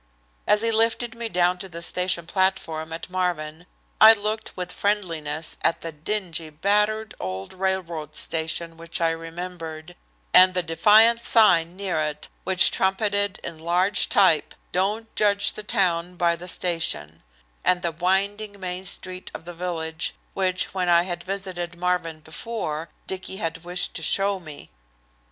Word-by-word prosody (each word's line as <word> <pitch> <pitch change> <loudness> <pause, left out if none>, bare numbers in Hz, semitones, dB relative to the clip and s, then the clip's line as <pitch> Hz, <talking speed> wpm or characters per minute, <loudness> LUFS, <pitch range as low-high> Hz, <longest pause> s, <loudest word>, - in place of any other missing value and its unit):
As 210 +1 +3
he 230 - +1
lifted 225 +1 +1
me 230 0 -4
down 180 -1 +2
to 190 - -7
the 170 -1 -6
station 180 -1 -1
platform 165 -4 -1
at 165 - -6
Marvin 175 -3 -3 0.3
I 220 +1 +10
looked 215 0 -3
with 180 -1 -4
friendliness 165 -7 -2
at - - +1
the 165 - -5
dingy, 165 0 -2
battered 210 +7 0
old 95 +1 -5
railroad 175 -5 -3
station 165 +1 -2
which 165 0 -3
I 165 -1 +2
remembered, 165 0 -7 0.4
at 185 0 +8
the 180 - +2
defiant 215 +7 +5
sign 175 -8 +4
near 190 -4 -2
it 150 -1 -3 0.2
which 190 -1 +5
trumpeted 200 +1 +1
in 165 -2 -7
large 180 +5 +2
type, 185 -7 +4 0.2
"Don't 210 +5 -1
judge 200 -1 +2
the - - -5
town 180 -4 +1
by 170 -1 +2
the 175 +2 -10
station," 165 - -1 0.4
and 180 0 +2
the 170 - 0
winding 200 +4 0
main 185 0 -4
street 185 0 -4
of - - -9
the 175 - -8
village, 165 -2 -3 0.2
which, 185 -1 -1
when 185 -2 -1
I 170 0 +5
had 175 -1 -5
visited 185 -3 -5
Marvin 175 -3 -2
before, 160 -2 -5 0.2
Dicky 190 0 -5
had 165 -3 -4
wished 180 +1 +1
to - - -5
show 195 +4 +2
me. 150 - -10
180 Hz, 150 wpm, -24 LUFS, 165-195 Hz, 0.4 s, I